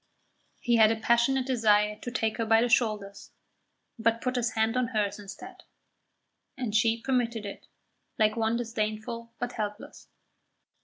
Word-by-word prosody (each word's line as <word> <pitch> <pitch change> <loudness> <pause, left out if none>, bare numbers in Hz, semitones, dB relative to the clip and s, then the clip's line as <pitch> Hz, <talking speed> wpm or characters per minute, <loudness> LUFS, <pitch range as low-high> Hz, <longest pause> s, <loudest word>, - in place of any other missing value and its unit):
He 240 -1 +2
had 220 -1 +6
a - - +1
passionate 235 +4 +2
desire 210 -4 +2
to 245 - -6
take 225 -3 -1
her 230 - -1
by 225 0 +5
the 245 - 0
shoulders, 210 -5 0 0.7
but 230 +1 +2
put 255 +1 -2
his 240 -2 0
hand 220 +1 +1
on 255 -1 +1
hers 210 -4 -1
instead, 200 -1 -10 1.0
and 240 -5 -3
she 225 0 +3
permitted 235 -3 -1
it, 200 - -8 0.5
like 215 -1 +3
one 225 0 0
disdainful 230 0 -4
but 245 0 -3
helpless. 210 -2 -6
225 Hz, 150 wpm, -28 LUFS, 215-240 Hz, 1.0 s, had